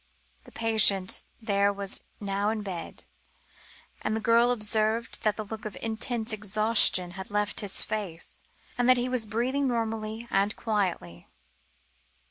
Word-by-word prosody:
The - - -14
patient 215 -4 +2
there 200 -3 +2
was 200 -1 -5 0.2
now 200 0 -1
in 215 -1 -2
bed, 185 -4 -6 1.0
and 215 - -1
the - - -1
girl 230 +2 +4
observed 220 0 0
that 210 -1 +1
the 215 - -4
look 220 +1 -7
of 215 - -6
intense 225 0 -2
exhaustion 210 -3 +4
had 190 +2 -8
left 210 0 -1
his 205 -2 +1
face, 200 -7 -4 0.4
and 245 0 +3
that 255 - +7
he 245 +1 0
was 250 -3 -1
breathing 255 +6 0
normally 225 -1 -2
and 200 +2 +2
quietly. 180 - -2
215 Hz, 140 wpm, -28 LUFS, 200-225 Hz, 1.0 s, that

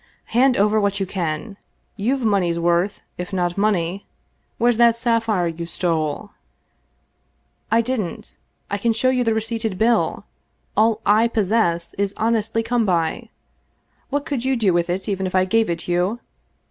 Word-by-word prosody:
Hand 255 +2 +4
over 210 +2 +3
what 200 0 0
you 195 - 0
can. 185 +2 -4 0.4
You've 250 +6 -1
money's 190 -6 +1
worth, 175 +3 +1 0.2
if 180 - -5
not 175 -2 -1
money. 195 -2 0 0.5
Where's 240 -1 +2
that 235 -1 +5
sapphire 225 -5 +1
you 165 0 -5
stole? 165 +3 -2 0.4
" - - -45
" - - -44
I 225 +1 +4
didn't. 230 -7 -4 0.3
I 200 - -1
can 230 +2 +1
show 240 +3 +1
you 250 -1 +1
the 225 -2 +1
receipted 220 -2 -2
bill. 230 +3 +1 0.5
All 220 +1 +4
/ 220 - -24 0.3
pos 205 -4 +1
sess 170 -7 +1
is 200 0 -1
honestly 225 0 0
come 240 0 +1
by. 180 +4 -1 0.8
What 285 +1 -1
could 270 -5 -3
you 265 0 +1
do 210 -7 +2
with 175 0 +1
it, 185 +4 -2
even 195 -2 -1
if 185 - -5
I 185 0 +4
gave 225 +2 +2
it 170 0 -3
you? 180 +6 0
210 Hz, 170 wpm, -21 LUFS, 180-230 Hz, 0.8 s, that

